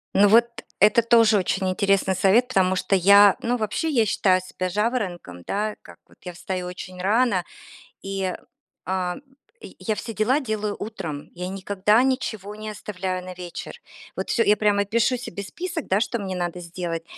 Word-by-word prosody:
Ну, 205 +1 +6
вот, 230 +3 +6 0.3
это 215 +3 +5
тоже 230 -2 +5
очень 190 0 0
интересный 195 0 +1
совет, 205 +7 +3
потому 190 -6 +2
что 185 +2 +1
я 200 +1 +7
ну, 240 +1 0
вообще 220 +8 -2
я 240 -7 +2
считаю 185 -2 +2
себя 185 0 -4
жаворонком, 185 - -2
да, 210 - -2
как - - -15
вот - - -23
я 180 - -7
встаю 180 +1 -4
очень 180 0 -8
рано, 205 -2 +2 0.6
и, 195 -1 -3 0.5
а, 180 -1 -2 0.4
я - - -11
я 220 - -2
все 225 +2 -6
дела 230 +8 +1
делаю 215 -5 -3
утром. 160 -9 -6
Я 180 +1 -5
никогда 200 +3 +1
ничего 220 -6 -2
не 215 0 -7
оставляю 185 -3 -5
на 185 - -7
вечер. 180 - -8 0.4
Вот - - -4
всё 235 - +2
я 210 - +4
прямо 205 -1 +2
пишу 235 +5 +1
себе 200 -5 -7
список, 345 - -5
да, 190 +2 +2
что 235 +1 -1
мне 195 -3 -4
надо 175 0 -3
сделать. 170 -1 -5
200 Hz, 175 wpm, -23 LUFS, 185-220 Hz, 0.6 s, я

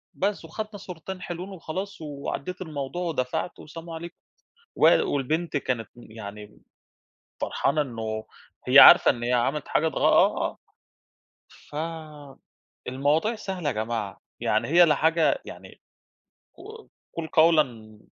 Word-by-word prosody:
وبس 200 -3 -2
وخدنا 215 +5 -6
صورتين 185 0 -8
حلوين 175 +2 -6
وخلاص 190 +1 -6
وعدّيت 150 +4 -5
الموضوع 155 0 -5
ودفعت 160 0 -3
وسلام 165 +2 -10
عليكم 165 +1 -7 0.6
وال - - +5
والبنت 155 +4 -1
كانت 125 -6 -2
يعني 105 -3 -11 0.8
فرحانة 150 +2 0
إنه 110 -4 -5 0.4
هي - - +7
عارفة - - +10
إن 120 - -3
هي 120 +1 0
عملت 135 +4 0
حاجات 160 0 +1
غ - - -3
آه، - - +3 1.2
آه. 155 -3 -7 0.3
ف - - -23
المواضيع 145 - +1
سهلة 190 -6 -5
يا - - -2
جماعة، 110 -3 -3 0.2
يعني 110 +2 0
هي 175 +3 +6
لا 150 -3 +3
حاجة 160 +2 +2
يعني - - -12 0.7
ق 440 +1 -12 0.3
قُل 165 -1 -4
قوْلًا 135 -11 +2
155 Hz, 125 wpm, -25 LUFS, 125-170 Hz, 1.2 s, عارفة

